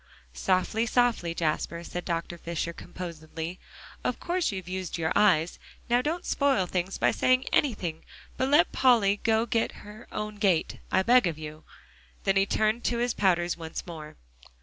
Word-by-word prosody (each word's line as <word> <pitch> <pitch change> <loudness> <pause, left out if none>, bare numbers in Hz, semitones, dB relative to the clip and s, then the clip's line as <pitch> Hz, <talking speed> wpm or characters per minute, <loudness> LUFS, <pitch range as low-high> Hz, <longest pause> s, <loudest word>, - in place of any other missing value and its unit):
"Softly, 195 +5 +1
softly, 230 -9 +1
Jasper," 170 +1 -1
said 175 +1 -6
Dr. 170 0 -3
Fisher 170 0 -3
composedly. 165 0 -7 0.4
"Of - - -1
course 355 -4 0
you've 190 -3 -6
used 185 -2 -4
your 160 -1 -1
eyes. 180 -6 +3 0.3
Now 245 +1 +5
don't 330 +6 -2
spoil 275 -10 +2
things 180 +1 -2
by - - +3
saying 255 0 +2
anything, 180 - 0 0.3
but 260 +1 0
let 295 +4 +5
Polly 225 -6 +4
'go 225 0 +2
her 215 -1 -3
own 210 0 -4
gait,' 195 -6 +1
I 190 - +3
beg 245 -1 +5
of 165 -3 -3
you." 155 0 -9 0.6
Then 195 - +2
he 195 0 +3
turned 220 +3 +1
to 235 - +1
his 240 0 0
powders 175 -3 +1
once 160 -1 -6
more. 155 -3 -9
190 Hz, 160 wpm, -28 LUFS, 170-235 Hz, 0.6 s, Now